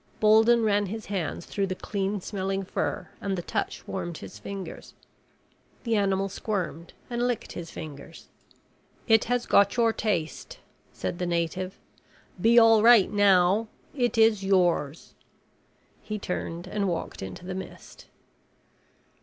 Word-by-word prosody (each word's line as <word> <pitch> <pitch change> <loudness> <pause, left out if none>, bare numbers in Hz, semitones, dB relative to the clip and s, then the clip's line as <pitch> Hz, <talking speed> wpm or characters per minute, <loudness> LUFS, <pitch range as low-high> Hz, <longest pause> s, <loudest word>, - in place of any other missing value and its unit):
Bolden 220 +2 +5
ran 205 -1 +2
his 220 +3 -6
hands 180 -4 -3
through 200 -1 -2
the 185 - -3
clean 200 0 -3
smelling 195 0 -3
fur 190 - -3
and 195 -1 -2
the 175 - -4
touch - - -4
warmed 170 -2 -4
his - - -10
fingers. 195 -2 -8 0.9
The 230 -2 0
animal 195 -1 +1
squirmed 190 -4 -4
and 240 0 -1
licked 245 -3 -3
his 170 -2 -7
fingers. 150 +2 -10 0.8
"It 225 -2 +5
has 245 0 0
got 200 +3 +4
your 230 -1 +3
taste," 175 -10 -3 0.3
said 175 - -5
the 180 - -1
native. 175 +2 -2 0.6
"Be 230 +3 +5
all 225 -2 +7
right 230 -4 +6
now. 200 +1 +4 0.3
It 245 -4 0
is 220 -3 +4
yours." 175 -6 +1 0.9
He 215 - -5
turned 175 -3 -4
and 200 +1 -2
walked 175 -2 -4
into 95 - -8
the 185 - -4
mist. 190 - -9
195 Hz, 135 wpm, -27 LUFS, 180-220 Hz, 0.9 s, all